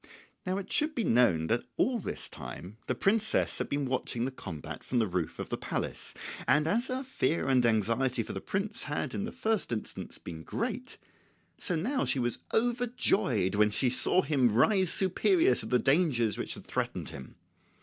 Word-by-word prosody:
Now 185 Hz, +1 st, 0 dB
it 200 Hz, -, -4 dB
should 305 Hz, +1 st, +2 dB
be 235 Hz, -, 0 dB
known 115 Hz, -, +3 dB
that 115 Hz, +8 st, +1 dB, 0.2 s
all 250 Hz, -2 st, +2 dB
this -, -, -3 dB
time 95 Hz, +5 st, -9 dB
the -, -, 0 dB
princess 220 Hz, +2 st, +2 dB
had -, -, -2 dB
been 140 Hz, 0 st, -1 dB
watching 125 Hz, -2 st, -1 dB
the 135 Hz, -, -2 dB
combat 85 Hz, -, -8 dB
from 125 Hz, -, -2 dB
the 115 Hz, -, +3 dB
roof 90 Hz, -4 st, -3 dB
of -, -, -5 dB
the -, -, -3 dB
palace; -, -, -3 dB, 0.3 s
and 145 Hz, +5 st, +4 dB
as 230 Hz, +10 st, +1 dB
her 260 Hz, +1 st, -2 dB
fear 165 Hz, -, 0 dB
and 130 Hz, -2 st, +4 dB
anxiety 115 Hz, +2 st, +1 dB
for -, -, -7 dB
the 95 Hz, -, -5 dB
prince 195 Hz, +2 st, -2 dB
had 145 Hz, -2 st, -3 dB
in 205 Hz, -, -2 dB
the -, -, -5 dB
first 220 Hz, -, -1 dB
instance 110 Hz, -2 st, -5 dB
been 80 Hz, -2 st, -8 dB
great, -, -, -4 dB, 0.6 s
so 180 Hz, -, 0 dB
now 245 Hz, -, -1 dB
was -, -, +1 dB
she 120 Hz, -3 st, +1 dB, 0.2 s
overjoyed 230 Hz, -, +1 dB
when 105 Hz, +1 st, +4 dB
she 120 Hz, +4 st, +2 dB
saw 180 Hz, +8 st, +4 dB
him 130 Hz, -8 st, +2 dB
rise 185 Hz, -, +4 dB
superior 335 Hz, -, +3 dB
to -, -, -4 dB
the 125 Hz, -, +3 dB
dangers 135 Hz, -5 st, +2 dB
which -, -, -2 dB
had -, -, -11 dB
threatened -, -, -3 dB
him. 65 Hz, -2 st, -10 dB
135 Hz, 190 wpm, -30 LUFS, -, 0.6 s, and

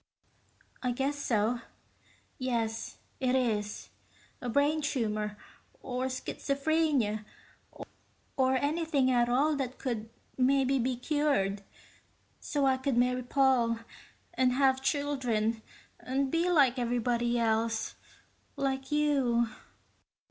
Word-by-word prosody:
"I 250 Hz, -1 st, 0 dB
guess 275 Hz, +4 st, -1 dB
so. 235 Hz, -4 st, 0 dB, 0.8 s
Yes, 230 Hz, -3 st, -2 dB, 0.2 s
it 255 Hz, -1 st, +1 dB
is. 215 Hz, -5 st, -1 dB, 0.5 s
A 245 Hz, -, -3 dB
brain 290 Hz, +5 st, +2 dB
tumor. 215 Hz, -7 st, -1 dB, 0.4 s
Or 250 Hz, 0 st, -3 dB
schizophrenia. 275 Hz, -3 st, 0 dB, 1.1 s
Or 260 Hz, -1 st, +3 dB
anything 290 Hz, -2 st, +1 dB
at 240 Hz, -1 st, +3 dB
all 285 Hz, +5 st, +3 dB
that 260 Hz, -2 st, -3 dB
could 225 Hz, -4 st, -3 dB, 0.3 s
maybe 270 Hz, +1 st, +3 dB
be 250 Hz, +1 st, 0 dB
cured, 250 Hz, -8 st, 0 dB, 0.8 s
so 285 Hz, -2 st, -1 dB
I 265 Hz, -1 st, +3 dB
could 260 Hz, -1 st, -1 dB
marry 250 Hz, +1 st, +2 dB
Paul 250 Hz, -3 st, +2 dB, 0.6 s
and 255 Hz, -1 st, +2 dB
have 265 Hz, 0 st, +3 dB
children 255 Hz, -6 st, 0 dB, 0.4 s
and 265 Hz, +1 st, -1 dB
be 335 Hz, +2 st, +1 dB
like 275 Hz, -7 st, +4 dB
everybody 240 Hz, 0 st, 0 dB
else. 225 Hz, -1 st, 0 dB, 0.6 s
Like 270 Hz, 0 st, -2 dB
you." 270 Hz, -6 st, +2 dB
255 Hz, 105 wpm, -30 LUFS, 235-275 Hz, 1.1 s, like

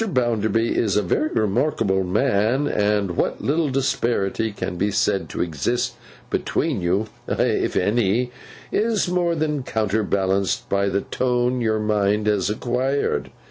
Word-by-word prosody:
Bounderby 115 Hz, -, +1 dB
is 105 Hz, -3 st, +1 dB
a 105 Hz, -, +2 dB
very 125 Hz, -, +1 dB
remarkable 105 Hz, -4 st, +1 dB
man; 110 Hz, +6 st, +1 dB
and 105 Hz, -2 st, +1 dB
what -, -, 0 dB
little 155 Hz, +2 st, +1 dB
disparity 115 Hz, -5 st, 0 dB
can 95 Hz, -2 st, -4 dB
be 100 Hz, +4 st, 0 dB
said 100 Hz, -1 st, 0 dB
to -, -, -1 dB
exist 120 Hz, -, -1 dB, 0.4 s
between -, -, -1 dB
you—if 95 Hz, +5 st, -1 dB
any—is 120 Hz, -, 0 dB
more 175 Hz, -1 st, +1 dB
than 150 Hz, -2 st, -1 dB
counterbalanced 100 Hz, -4 st, 0 dB
by 100 Hz, 0 st, +1 dB
the 100 Hz, -, 0 dB
tone 125 Hz, +1 st, 0 dB
your 110 Hz, -2 st, +1 dB
mind 105 Hz, -1 st, +1 dB
has 105 Hz, -3 st, +1 dB
acquired. 125 Hz, +5 st, -1 dB
110 Hz, 125 wpm, -22 LUFS, 100-125 Hz, 0.4 s, a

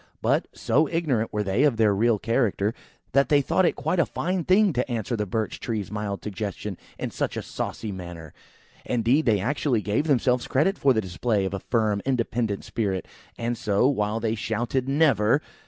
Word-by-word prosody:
But, -, -, +2 dB
so 155 Hz, +2 st, +1 dB
ignorant 145 Hz, -10 st, 0 dB
were 105 Hz, -1 st, -1 dB
they 100 Hz, +5 st, 0 dB
of 140 Hz, -6 st, +3 dB
their 110 Hz, -2 st, +4 dB
real 110 Hz, +2 st, +3 dB
character, 110 Hz, -2 st, 0 dB, 0.4 s
that 140 Hz, 0 st, +3 dB
they 145 Hz, -, +5 dB
thought 175 Hz, +6 st, +2 dB
it -, -, 0 dB
quite 180 Hz, -, -1 dB
a 170 Hz, -, +4 dB
fine 180 Hz, +1 st, -2 dB
thing 190 Hz, +2 st, +4 dB
to 125 Hz, 0 st, -1 dB
answer 120 Hz, +1 st, -2 dB
the 105 Hz, -2 st, -2 dB
Birch 110 Hz, +3 st, -2 dB
tree's 110 Hz, -5 st, -3 dB
mild 105 Hz, -2 st, -4 dB
suggestion 105 Hz, -1 st, -5 dB, 0.2 s
in -, -, -4 dB
such -, -, -2 dB
a -, -, -3 dB
saucy 110 Hz, -, -4 dB
manner. 85 Hz, -4 st, -8 dB, 0.5 s
Indeed, 125 Hz, +5 st, +1 dB
they 105 Hz, -3 st, +4 dB
actually 125 Hz, 0 st, 0 dB
gave 110 Hz, +9 st, 0 dB
themselves 125 Hz, -3 st, +2 dB
credit 160 Hz, +9 st, +1 dB
for 140 Hz, -, +4 dB
the 110 Hz, -, +1 dB
display 100 Hz, +2 st, -1 dB
of 95 Hz, -, -3 dB
a 100 Hz, -, -2 dB
firm, 110 Hz, -3 st, 0 dB
independent 115 Hz, -5 st, -1 dB
spirit 95 Hz, -6 st, -2 dB, 0.3 s
and 120 Hz, +1 st, -1 dB
so, 105 Hz, +2 st, +2 dB
while 110 Hz, -5 st, 0 dB
they 110 Hz, -1 st, 0 dB
shouted 120 Hz, +4 st, -2 dB
"Never!" 135 Hz, -5 st, +3 dB
115 Hz, 190 wpm, -25 LUFS, 105-135 Hz, 0.5 s, they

